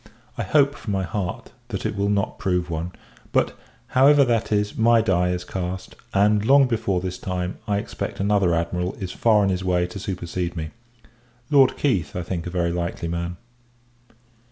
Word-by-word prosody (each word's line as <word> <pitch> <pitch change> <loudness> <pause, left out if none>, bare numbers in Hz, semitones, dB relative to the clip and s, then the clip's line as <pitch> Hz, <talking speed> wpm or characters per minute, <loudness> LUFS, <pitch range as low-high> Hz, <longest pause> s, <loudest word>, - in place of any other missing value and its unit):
I - - -3
hope, 140 -2 +3
from 105 -7 -5
my 95 -1 0
heart, 90 0 -4 0.2
that - - -5
it - - -1
will 100 +1 0
not 100 +1 -1
prove 90 -4 0
one. 85 +2 -3 0.4
But, - - +1 0.3
however 140 +2 +6
that 115 -3 0
is, 105 0 +1
my 115 +1 +5
die 90 -5 +2
is 90 0 -2
cast; 90 0 -5 0.2
and, 105 +1 +3
long 135 +4 +6
before 110 -6 0
this 90 0 -4
time, 90 -1 -3
I 100 -1 +1
expect, 100 - -5
another 100 -3 +2
Admiral 90 +2 -1
is 95 -4 -5
far 110 -1 +3
on 100 - +2
his 95 -1 -1
way 90 -1 +2
to 90 +3 -7
supersede 90 -2 -4
me. 80 -2 -4 0.8
Lord 135 -3 +5
Keith, 95 - 0
I 90 - -2
think 85 -1 -4
a - - -2
very 85 -1 0
likely 85 -1 -3
man. 85 +1 -3
95 Hz, 180 wpm, -23 LUFS, 90-105 Hz, 0.8 s, however